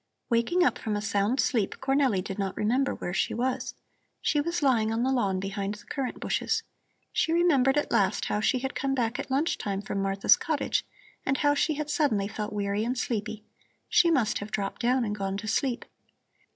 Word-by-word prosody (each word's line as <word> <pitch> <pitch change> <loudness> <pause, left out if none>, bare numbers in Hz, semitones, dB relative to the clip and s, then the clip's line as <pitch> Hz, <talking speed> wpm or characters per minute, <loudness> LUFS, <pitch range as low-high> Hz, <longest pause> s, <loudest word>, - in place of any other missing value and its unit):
Waking 235 +11 +3
up - - +2
from 215 -2 -2
a - - 0
sound 205 +4 0
sleep, 220 -7 +1
Cornelli 270 -8 +2
did 195 +1 -6
not 195 -1 -2
remember 255 +6 +1
where 175 - -5
she 185 - 0
was. 250 +2 -2 0.4
She 295 - +1
was 340 +1 -2
lying 230 -5 +3
on 225 +2 0
the 260 - +1
lawn 200 -8 +1
behind 195 +1 -3
the 210 - -15
currant 270 -3 -4
bushes. - - 0 0.5
She 355 -2 +1
remembered 295 -6 +3
at 295 - 0
last 195 0 +2
how 210 - 0
she 255 +5 +2
had 265 +2 -3
come 270 0 -1
back 235 -2 -1
at - - -5
lunch 285 +6 0
time 200 -1 -3
from 195 -1 -2
Martha's 195 0 +4
cottage 310 -4 -1 0.4
and 270 0 +1
how 290 +1 +3
she 300 +1 +1
had 300 0 -3
suddenly 225 -11 +1
felt 210 0 -5
weary 205 0 -1
and 250 +3 -1
sleepy. 215 -3 -3 0.5
She 340 - +5
must 255 -9 +2
have 205 - -6
dropped 200 0 -3
down 250 0 +2
and 210 - -2
gone 195 -1 -3
to 215 - -6
sleep. 245 +2 0
235 Hz, 205 wpm, -28 LUFS, 205-275 Hz, 0.5 s, She